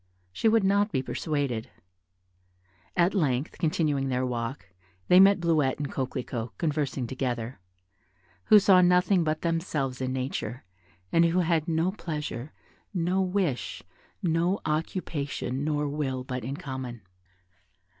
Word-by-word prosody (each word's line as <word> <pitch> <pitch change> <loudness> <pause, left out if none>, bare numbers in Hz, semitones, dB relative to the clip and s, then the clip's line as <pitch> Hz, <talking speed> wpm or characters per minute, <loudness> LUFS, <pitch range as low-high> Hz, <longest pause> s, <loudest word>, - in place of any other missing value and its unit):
She 225 - +1
would 220 -1 +4
not 200 +2 +3
be 130 -6 0
persuaded; 140 -7 -2 1.3
at 175 +2 +4
length, 145 -7 0
continuing 150 -4 +1
their 130 0 0
walk, 120 -2 -4 0.4
they 180 - +8
met 195 +1 +7
Bleuette 155 -6 +2
and 145 -1 -4
Coquelicot, 125 -3 -4
conversing 145 -5 -1
together, 120 -2 -3 0.9
who 215 - +8
saw 195 -2 +6
nothing 180 +1 +4
but 155 0 -1
themselves 155 -6 -1
in 130 0 -1
nature, 130 -1 -3 0.5
and 165 0 +5
who 170 +2 +2
had 165 -2 +1
no 165 +2 +1
pleasure, 150 - -5 0.4
no 180 +2 +1
wish, 185 -8 -1 0.4
no 175 +3 +1
occupation 150 -4 -2
nor 150 -1 0
will 140 -3 -2
but 125 -1 -5
in 135 +4 -4
common. 130 - -6
150 Hz, 125 wpm, -27 LUFS, 130-175 Hz, 1.3 s, they